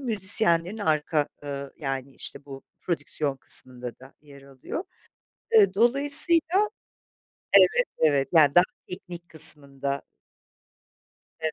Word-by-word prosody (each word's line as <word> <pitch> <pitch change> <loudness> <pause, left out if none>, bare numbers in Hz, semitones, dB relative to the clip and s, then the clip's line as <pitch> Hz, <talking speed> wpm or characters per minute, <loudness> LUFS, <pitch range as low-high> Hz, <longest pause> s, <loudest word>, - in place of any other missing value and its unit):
müzisyenlerin 200 -5 +3
arka, 155 -4 -2 0.2
ııı, 140 -1 -8
yani, 135 -2 -7
işte - - -6
bu 135 -1 -12 0.2
prodüksiyon 150 -5 -5
kısmında 125 -2 -1
da 130 +1 -17
yer 140 -2 -18
alıyor. 140 - -9 0.7
Iıı, 410 - +3
dolayısıyla, 290 - +4 0.9
evet, - - +3
evet, 140 -3 0
yani 150 -4 +3
daha 175 - +5 0.2
teknik 175 -2 -11
kısmında. 140 -3 -1 1.4
Evet, 160 -1 -4
155 Hz, 105 wpm, -23 LUFS, 140-205 Hz, 1.4 s, daha